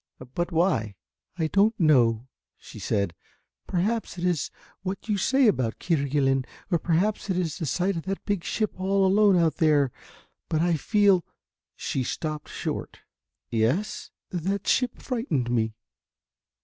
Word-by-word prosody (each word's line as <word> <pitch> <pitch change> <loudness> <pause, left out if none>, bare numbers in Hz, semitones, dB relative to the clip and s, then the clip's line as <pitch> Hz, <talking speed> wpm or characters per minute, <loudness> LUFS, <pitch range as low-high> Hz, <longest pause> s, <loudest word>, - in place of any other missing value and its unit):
"But 175 +3 -1
why?" 160 - +1 0.4
"I 160 - +1
don't 205 +7 +2
know," 125 -7 +4 0.3
said 100 -4 -2
she, - - -43 0.5
"perhaps 205 +3 -1
it 175 - -5
is 175 -5 0 0.3
what 190 +3 -5
you 210 - +1
say 265 +7 +3
about 130 - +2
Kerguelen, 140 -4 +1 0.3
or 170 - +3
perhaps 185 +7 0
it 185 - +1
was 170 -1 -2
the 160 - -2
sight 185 +8 0
of 165 - -5
that 195 0 -4
big 200 -5 -1
ship 215 -1 -2
all 195 +1 +2
alone 200 0 +5
out 165 -2 +2
there, 145 -5 +3 0.6
but 155 - +1
I 170 +1 +2
feel 200 +1 +3 0.3
" - - -67
she 135 - -2
stopped 155 +4 -4
short. - - -5 0.5
"Yes 120 - 0
" - - -67
"That 190 +2 -2
ship 250 -2 +2
frightened 165 - -1
me." 110 -2 0
175 Hz, 150 wpm, -26 LUFS, 140-195 Hz, 0.6 s, alone